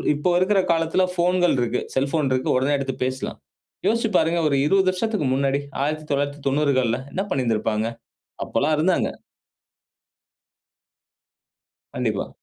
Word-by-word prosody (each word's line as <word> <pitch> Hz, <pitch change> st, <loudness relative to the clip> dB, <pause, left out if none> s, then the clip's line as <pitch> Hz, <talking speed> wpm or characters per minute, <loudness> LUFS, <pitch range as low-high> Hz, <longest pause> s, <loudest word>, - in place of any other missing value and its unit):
இப்போ 150 Hz, +5 st, 0 dB
இருக்குற 195 Hz, +1 st, +3 dB
காலத்துல 165 Hz, +3 st, +1 dB
ஃபோன்கள் 180 Hz, -2 st, +2 dB
இருக்கு. 120 Hz, 0 st, 0 dB
செல்போன் 140 Hz, +1 st, +1 dB
இருக்கு. 130 Hz, 0 st, 0 dB
உடனே 140 Hz, +3 st, +1 dB
எடுத்துப் 135 Hz, -2 st, -4 dB
பேசலாம். 130 Hz, 0 st, -4 dB, 0.5 s
யோசிச்சு 225 Hz, +1 st, +1 dB
பாருங்க 165 Hz, +1 st, +2 dB
ஒரு 140 Hz, -, +1 dB
20 190 Hz, +2 st, +3 dB
வருஷத்துக்கு 185 Hz, -6 st, -1 dB
முன்னாடி 135 Hz, +1 st, +1 dB, 0.2 s
1990கள்ல 145 Hz, -4 st, 0 dB
என்ன 190 Hz, -, -2 dB
பண்ணி 135 Hz, -2 st, 0 dB
இருந்திருப்பாங்க. 110 Hz, -1 st, 0 dB, 0.6 s
அப்பல்லாம் 155 Hz, +2 st, 0 dB
இருந்தாங்க. 175 Hz, +3 st, +2 dB, 2.9 s
கண்டிப்பா. -, -, -2 dB
145 Hz, 110 wpm, -23 LUFS, 135-175 Hz, 2.9 s, இருக்குற